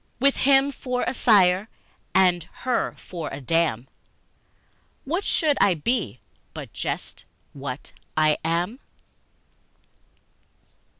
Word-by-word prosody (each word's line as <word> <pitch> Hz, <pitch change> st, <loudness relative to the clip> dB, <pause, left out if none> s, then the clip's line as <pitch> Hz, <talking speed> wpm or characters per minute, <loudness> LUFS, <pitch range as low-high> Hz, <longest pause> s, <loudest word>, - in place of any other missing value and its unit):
With 275 Hz, +2 st, +4 dB
him 275 Hz, +1 st, +4 dB
for 250 Hz, -2 st, -3 dB
a -, -, -1 dB
sire 200 Hz, -4 st, +4 dB, 0.5 s
and 180 Hz, -3 st, +4 dB, 0.2 s
her 255 Hz, -1 st, 0 dB
for 170 Hz, -3 st, -6 dB
a -, -, -5 dB
dam, 145 Hz, -4 st, 0 dB, 1.2 s
What 340 Hz, +8 st, -1 dB
should 305 Hz, -7 st, +2 dB
I 190 Hz, -3 st, +5 dB
be 150 Hz, -, -1 dB, 0.4 s
but -, -, -8 dB
just -, -, -5 dB, 0.3 s
what 140 Hz, -1 st, -7 dB, 0.3 s
I 155 Hz, -1 st, +3 dB
am? 175 Hz, +9 st, -1 dB
185 Hz, 105 wpm, -24 LUFS, 155-255 Hz, 1.2 s, I